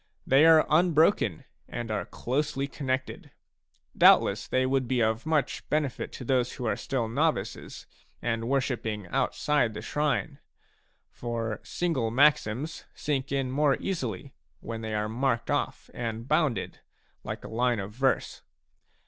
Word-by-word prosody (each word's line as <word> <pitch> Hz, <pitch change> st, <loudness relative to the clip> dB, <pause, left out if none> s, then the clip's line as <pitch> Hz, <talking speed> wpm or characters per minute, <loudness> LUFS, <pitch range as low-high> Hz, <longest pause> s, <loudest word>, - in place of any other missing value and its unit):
They 140 Hz, +5 st, +6 dB
are 160 Hz, -1 st, +7 dB
unbroken 160 Hz, -, +3 dB, 0.2 s
and 120 Hz, -2 st, -4 dB
are 105 Hz, -2 st, -2 dB
closely 140 Hz, +2 st, -2 dB
connected. 130 Hz, -2 st, -3 dB, 0.7 s
Doubtless -, -, +5 dB
they 130 Hz, 0 st, +1 dB
would 130 Hz, -1 st, +1 dB
be 130 Hz, -1 st, +1 dB
of 110 Hz, +4 st, 0 dB
much 155 Hz, -4 st, 0 dB
benefit 150 Hz, -4 st, -1 dB
to 125 Hz, -, -7 dB
those 125 Hz, -1 st, +1 dB
who 125 Hz, -, -6 dB
are 110 Hz, -, +1 dB
still 130 Hz, -5 st, -2 dB
novices 115 Hz, -, -2 dB, 0.3 s
and 115 Hz, 0 st, -2 dB
worshipping 120 Hz, -6 st, -1 dB
outside 125 Hz, -2 st, +1 dB
the 105 Hz, -, -5 dB
shrine; 150 Hz, +1 st, -1 dB, 0.7 s
for 115 Hz, -2 st, -4 dB
single 160 Hz, -10 st, -1 dB
maxims 140 Hz, +2 st, +2 dB
sink 140 Hz, -2 st, -2 dB
in 135 Hz, -2 st, -1 dB
more 140 Hz, 0 st, +3 dB
easily 135 Hz, -, -4 dB, 0.3 s
when 115 Hz, +4 st, -6 dB
they 110 Hz, -1 st, -3 dB
are 105 Hz, 0 st, 0 dB
marked 115 Hz, +1 st, -1 dB
off -, -, -2 dB
and 115 Hz, 0 st, -4 dB
bounded 135 Hz, -, 0 dB, 0.4 s
like -, -, -6 dB
a -, -, -7 dB
line 120 Hz, 0 st, +1 dB
of 100 Hz, +1 st, -5 dB
verse. 130 Hz, +3 st, 0 dB
130 Hz, 140 wpm, -28 LUFS, 115-145 Hz, 0.7 s, are